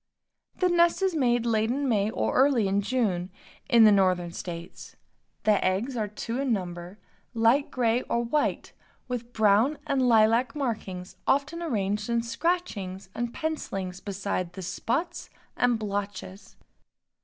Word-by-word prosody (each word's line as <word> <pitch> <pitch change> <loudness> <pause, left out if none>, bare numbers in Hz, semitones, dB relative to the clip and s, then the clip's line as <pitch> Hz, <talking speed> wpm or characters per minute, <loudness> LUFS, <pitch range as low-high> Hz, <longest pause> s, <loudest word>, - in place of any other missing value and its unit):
The 365 - +2
nest 345 +1 +3
is 380 -2 +2
made 240 -6 +1
late 220 -1 +1
in 275 +3 -1
May 210 -4 +2
or - - -1
early 260 -6 +3
in 195 +1 +1
June, 200 -6 -1 0.4
in 235 -3 +7
the 215 - +8
Northern 185 -3 +2
states. 170 0 -8 0.5
The 210 -2 +3
eggs 200 +8 0
are 215 -3 -1
two 230 +4 -5
in 275 -2 0
number, 180 -2 -4 0.4
light 230 +5 +3
gray 240 -1 +1
or 235 - +1
white, 290 +6 -1 0.3
with 245 -1 -5
brown 220 +6 +3
and 275 -1 0
lilac 230 +4 +4
markings 205 -9 -4
often 290 +5 +1
arranged 210 - -1
in 235 0 +1
scratchings 230 - -2
and 240 0 -3
pencilings 195 - -4
besides 195 -3 -3
the 190 0 -7
spots 225 - -3 0.3
and 245 -1 +2
blotches. 200 -2 -5
225 Hz, 145 wpm, -27 LUFS, 195-255 Hz, 0.5 s, the